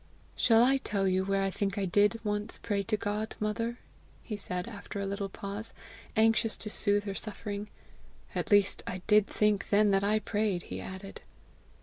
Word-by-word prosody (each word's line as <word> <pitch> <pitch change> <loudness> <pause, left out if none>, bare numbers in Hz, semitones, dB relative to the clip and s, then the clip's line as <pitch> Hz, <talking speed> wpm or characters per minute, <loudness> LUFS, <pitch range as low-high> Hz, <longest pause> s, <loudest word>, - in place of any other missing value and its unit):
"Shall 230 -1 +5
I 270 +2 +4
tell 200 -7 -1
you 185 0 +2
where 195 0 +1
I 195 - 0
think 195 0 -2
I 200 - +1
did 205 +4 +3
once 210 0 -2
pray 205 -2 -1
to 215 +2 -1
God, 210 +2 -3
mother?" 230 +3 -1 0.5
he 215 - -4
said, 180 -3 -4
after 205 -2 -7
a 200 - -2
little 200 0 -3
pause, 200 +3 -6 0.4
anxious 225 0 +3
to 215 - -5
soothe 205 -1 +2
her 200 -1 -4
suffering. 205 0 -5 0.7
"At - - -2
least 205 -2 +4
I 185 0 -4
did 210 -1 +5
think 210 -1 +1
then 205 0 +4
that 195 0 +3
I 210 +2 +3
prayed!" 210 -4 -1
he - - -6
added. 190 +1 -8
205 Hz, 185 wpm, -30 LUFS, 195-215 Hz, 0.7 s, Shall